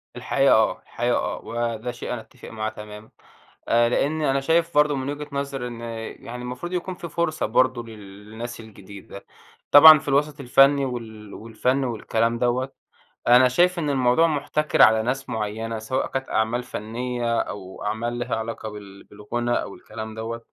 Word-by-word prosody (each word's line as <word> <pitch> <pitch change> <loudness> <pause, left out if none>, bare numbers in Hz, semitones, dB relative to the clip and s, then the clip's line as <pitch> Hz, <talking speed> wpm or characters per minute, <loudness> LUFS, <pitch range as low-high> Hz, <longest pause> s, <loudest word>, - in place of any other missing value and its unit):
الحقيقة - - +2
آه، - - +2
الحقيقة - - -1
آه، - - -3
وده 115 0 -3
شيء 120 - -8
أنا 120 - -5
باتِّفق - - -14
معاه 110 -1 -3
تمامًا، 105 0 -11 0.6
آآ 120 0 +4
لأني 150 +4 0
أنا 135 0 +1
شايف 165 +4 +1
برضه 150 0 +3
من 135 +1 -3
وجهة 145 +1 -6
نظري 140 -2 -3
إن، 120 -1 -9 0.4
يعني 125 +1 -7
المفروض 125 +8 -6
يكون 180 +1 -3
في 175 -1 -8
فُرصة 165 -1 -1
برضه 130 -2 +2
لل 105 -2 -12
للناس 120 +2 -7
الجديدة، 100 -2 -12 0.4
طبعًا 155 +1 +10
في - - -10
الوسَط 145 +1 +1
الفني 140 +2 +4
وال 110 -5 -7
والفن 125 +4 -1
والكَلام 115 0 -1
دوّة، 125 +2 0 0.6
أنا 125 +2 +7
شايف 175 +7 +2
إن 150 - -1
الموضوع 135 +4 +3
مُحتَكَر 150 0 0
على 110 0 +6
ناس 135 +3 -3
معيّنة، 110 +1 -3
سواء 120 +4 -2
كانت 135 0 -4
أعمال 115 +3 0
فنية، 120 +1 -3
أو 95 -2 -8
أعمال 110 +3 -2
ليها 120 +1 -2
علاقة 110 0 -5
بال 100 -2 -11
بالغُنا 120 +4 -3
أو - - -9
الكلام 110 0 -8
دوّة. 115 +1 -5
120 Hz, 165 wpm, -23 LUFS, 110-140 Hz, 0.6 s, طبعًا